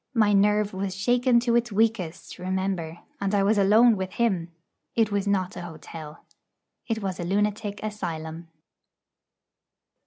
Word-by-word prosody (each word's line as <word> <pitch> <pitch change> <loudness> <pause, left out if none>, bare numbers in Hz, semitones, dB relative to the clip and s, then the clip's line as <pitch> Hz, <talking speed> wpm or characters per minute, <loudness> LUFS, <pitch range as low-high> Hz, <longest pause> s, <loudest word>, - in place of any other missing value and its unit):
My 215 -3 +4
nerve 210 +1 +3
was 190 0 -3
shaken 245 +4 +3
to 235 -1 +1
its 240 -1 +1
weakest, 205 -5 -1
remember; 185 -3 -2 0.2
and 200 +1 0
I 200 - +3
was 205 +1 +3
alone 220 +4 +6
with 190 -1 -4
him! 185 -8 0 0.4
It 225 -2 +2
was 200 0 0
not 190 -1 0
an 175 - -6
hotel. 160 -1 -10 0.6
It 225 -3 -2
was 190 -2 -3
a - - -2
lunatic 205 +2 -1
asylum. 170 -6 -5
200 Hz, 145 wpm, -26 LUFS, 180-215 Hz, 0.6 s, alone